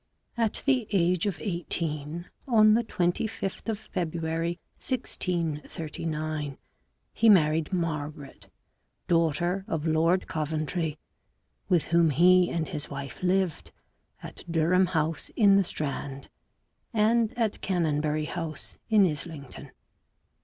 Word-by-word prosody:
At 230 -3 0
the 260 -6 +2
age 180 -1 +2
of 195 - -2
eighteen, 170 -4 -3 0.2
on 215 -4 +6
the 235 +2 +3
25th 195 +2 -2
of 220 - 0
February 170 -3 -3 0.2
1639, 155 - -3 0.6
h - - -14
e 225 - +8
married 160 -5 +4
Margaret, 155 -5 -4 0.6
daughter 170 +3 +1
of 160 -1 -2
Lord 165 +3 +2
Coventry, 155 +1 -2 0.7
with 175 -4 +4
whom 170 -1 +5
he 180 +4 +5
and 165 -2 -2
his 150 -5 -4
wife 140 -1 -7
lived 180 - 0 0.5
at - - -9
Durham 175 +3 +3
House 160 -3 -1
in 200 -3 +6
the 200 - +5
Strand, 140 -4 -4 0.6
and 230 +1 +2
at 225 -3 0
Canonbury 155 -4 0
House 160 -2 -5
in 215 -3 +6
Islington. 150 -4 -5
170 Hz, 110 wpm, -27 LUFS, 155-190 Hz, 0.7 s, e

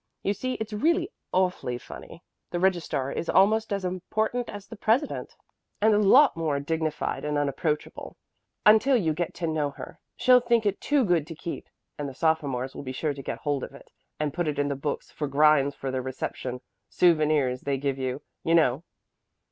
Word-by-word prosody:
You 200 - +1
see 255 +5 -3
it's 220 0 -5
really 335 - +1 0.2
awfully 180 -9 0
funny. - - -11 0.3
The 175 - -2
registrar 170 -7 0
is 170 - -4
almost 215 +3 +3
as 200 -2 -1
important 220 +6 -2
as 205 -1 -8
the 225 - -10
president, 230 +7 0 0.4
and 215 +1 +4
a 205 - +4
lot 250 +7 +6
more 155 -4 -1
dignified 160 +1 -2
and 150 0 -1
unapproachable, 145 +2 -2 0.5
until 220 +5 +6
you 165 -8 +1
get 170 +2 -3
to 170 - -3
know 155 -3 0
her. 140 - -10 0.2
She'll 250 0 +6
think 235 -2 +1
it 205 - 0
too 290 -4 +2
good 170 -5 +1
to 165 - -7
keep, 170 - -6 0.3
and 145 -1 -3
the 135 - -11
sophomores 140 -5 0
will - - -7
be 130 -2 -6
sure 150 +3 -1
to 140 - -8
get - - -5
hold 145 -3 -1
of - - -8
it - - -16 0.3
and 150 -2 -1
put 175 -2 -1
it 150 - -2
in 145 0 +1
the 140 - -1
book 140 +2 -3 0.2
of 150 -2 -1
grinds 140 -1 +4
for 135 - -4
their 130 0 -2
reception 125 -1 -5 0.3
souvenirs 155 -7 +2
they 140 -1 -1
give 135 0 -2
you, 130 +2 -3 0.2
you 165 - +3
know. 150 -4 +3
160 Hz, 195 wpm, -26 LUFS, 140-205 Hz, 0.5 s, lot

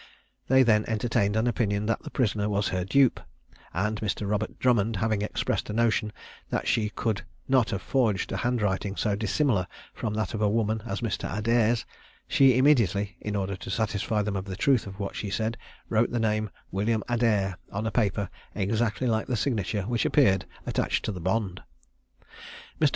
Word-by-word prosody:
They 130 0 +6
then 110 -3 +4
entertained 110 -2 +1
an 110 +1 +2
opinion 105 -4 0
that 115 - 0
the - - -8
prisoner 105 -4 0
was 100 0 0
her 90 -1 -1
dupe; 130 +6 +3 0.5
and 105 +5 -1
Mr. 105 -1 -2
Robert 105 +1 -2
Drummond 115 -3 +2
having 110 +1 0
expressed 105 - -2
a - - -2
notion 115 -2 +1 0.4
that - - -2
she 105 -2 +2
could 110 -1 -2 0.3
not 130 -4 +3
have 100 - -3
forged 115 -8 +1
a 95 - -1
handwriting 105 -4 0
so 105 -1 0
dissimilar 110 - +1 0.3
from 105 -2 -3
that 105 -3 -2
of 110 - -3
a 105 - +3
woman 110 0 0
as - - -3
Mr. 115 -4 -2
Adair's, 115 +1 +2 0.4
she 135 -5 +5
immediately, 105 - +3
in 105 0 -3
order 100 -1 -1
to - - -8
satisfy 105 +1 0
them 105 -1 -2
of 95 0 -3
the 95 -2 -5
truth 120 +1 +2
of 95 0 -9
what 100 -1 -4
she 105 - -3
said, 110 +3 -1 0.3
wrote 115 +1 +2
the 120 - -1
name 110 -1 0 0.2
"William 105 +3 0
Adair" 105 -6 +1
on 105 +2 -3
a 110 - -1
paper 100 -3 +1 0.3
exactly 110 +4 0
like 110 -2 +1
the 125 - 0
signature 105 -5 -1
which 115 +3 0
appeared 95 -10 +3 0.2
attached - - 0
to - - -1
the 90 -4 -6
bond. 95 0 -1 1.2
Mr. - - +5
110 Hz, 185 wpm, -27 LUFS, 100-115 Hz, 1.2 s, They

